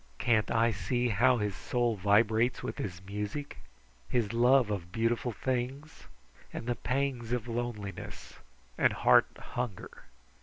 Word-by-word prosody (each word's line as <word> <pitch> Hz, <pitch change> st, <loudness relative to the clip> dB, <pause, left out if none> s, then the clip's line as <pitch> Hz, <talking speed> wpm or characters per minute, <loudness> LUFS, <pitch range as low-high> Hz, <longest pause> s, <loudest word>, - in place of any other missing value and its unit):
Can't 115 Hz, -3 st, +2 dB
I 115 Hz, 0 st, +3 dB
see 120 Hz, +5 st, -1 dB
how 120 Hz, +4 st, +4 dB
his 105 Hz, -3 st, -2 dB
soul 120 Hz, +1 st, 0 dB
vibrates 110 Hz, +4 st, +2 dB
with -, -, -5 dB
his 90 Hz, -3 st, -4 dB
music, 105 Hz, +9 st, -5 dB, 0.5 s
his 115 Hz, -3 st, 0 dB
love 120 Hz, -1 st, +4 dB
of 90 Hz, -4 st, -4 dB
beautiful 115 Hz, +3 st, 0 dB
things 130 Hz, +6 st, -4 dB, 0.4 s
and -, -, -6 dB
the 120 Hz, -, 0 dB
pangs 125 Hz, -2 st, -2 dB
of 120 Hz, -1 st, -1 dB
loneliness 115 Hz, -5 st, -5 dB, 0.4 s
and -, -, +4 dB
heart -, -, +5 dB
hunger? 125 Hz, -6 st, -6 dB
115 Hz, 130 wpm, -30 LUFS, 105-125 Hz, 0.5 s, heart